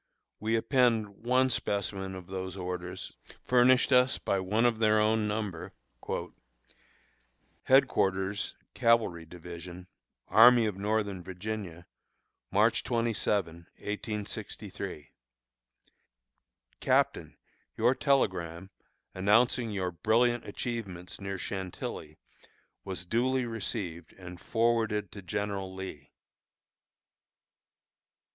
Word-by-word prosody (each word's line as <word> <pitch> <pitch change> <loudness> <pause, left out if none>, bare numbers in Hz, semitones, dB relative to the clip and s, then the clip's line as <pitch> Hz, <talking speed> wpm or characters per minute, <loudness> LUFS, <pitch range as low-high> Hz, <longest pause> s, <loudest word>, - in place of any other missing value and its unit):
We 110 +1 0
append 115 -3 +2
one 125 +5 +1
specimen 100 -3 -2
of 90 -1 -8
those 95 +1 -5
orders, 90 0 -5 0.3
furnished 125 +1 +5
us 125 +1 +5
by 100 - 0
one 105 +5 +1
of 115 -2 +2
their 110 -1 +4
own 110 0 +2
number: 105 -5 -4 1.9
HEADQUARTERS, 100 -6 +2 0.2
CAVALRY 110 -8 +2
DIVISION, 90 +1 -9 0.4
Army 120 +1 +7
of 105 -3 -1
Northern 100 -1 -1
Virginia, 95 -2 -6 0.6
March - - +3
27, 105 -7 -1
1863. 105 -7 -5 1.7
CAPTAIN - - +1 0.4
Your 125 - +4
telegram, 95 - 0 0.4
announcing 115 +5 +3
your 95 -3 -2
brilliant 120 +6 +2
achievements 100 -7 -5
near 100 0 -4
Chantilly, 90 -6 -5 0.7
was 95 -2 -5
duly 125 +6 +1
received 100 -7 -4
and 90 -1 -11
forwarded 115 -3 +1
to 100 - -9
General 100 +1 -3
Lee. 95 -7 -8
100 Hz, 90 wpm, -30 LUFS, 90-115 Hz, 1.9 s, Army